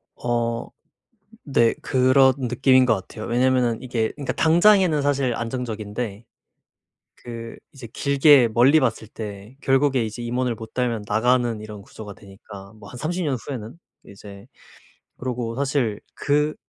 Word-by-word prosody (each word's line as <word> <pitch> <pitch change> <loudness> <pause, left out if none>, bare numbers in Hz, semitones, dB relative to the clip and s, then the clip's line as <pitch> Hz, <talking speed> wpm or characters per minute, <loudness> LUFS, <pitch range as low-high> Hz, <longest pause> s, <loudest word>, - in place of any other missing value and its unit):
어 115 -1 -2 0.8
네 120 -5 +2
그런 130 0 +4
느낌인 130 +1 +3
거 120 - +4
같아요. 110 +2 -8
왜냐면은 125 -1 +1
이게 120 -3 -2
그니까 140 -2 -4
당장에는 175 -1 +4
사실 140 -3 0
안정적인데 115 -3 -5 0.9
그 115 -1 -9 0.2
이제 130 -4 -10
길게 140 -2 +4
멀리 130 +7 +5
봤을 115 -5 -1
때 105 +1 -9
결국에 135 -2 +2
이제 110 +2 -7
임원을 120 +1 -1
못 110 0 -11
달면 120 -4 -1
나가는 120 +1 +1
이런 105 -1 -9
구조가 105 0 -11
되니까 100 0 -13
뭐 110 - -14
한 - - -11
30 175 +6 -3
년 140 -3 0
후에는 120 0 -7 0.3
이제 100 0 -12 0.7
그러고 120 -2 -4
사실 135 -6 -1 0.2
그 150 +1 0
120 Hz, 275 characters per minute, -22 LUFS, 110-135 Hz, 0.9 s, 멀리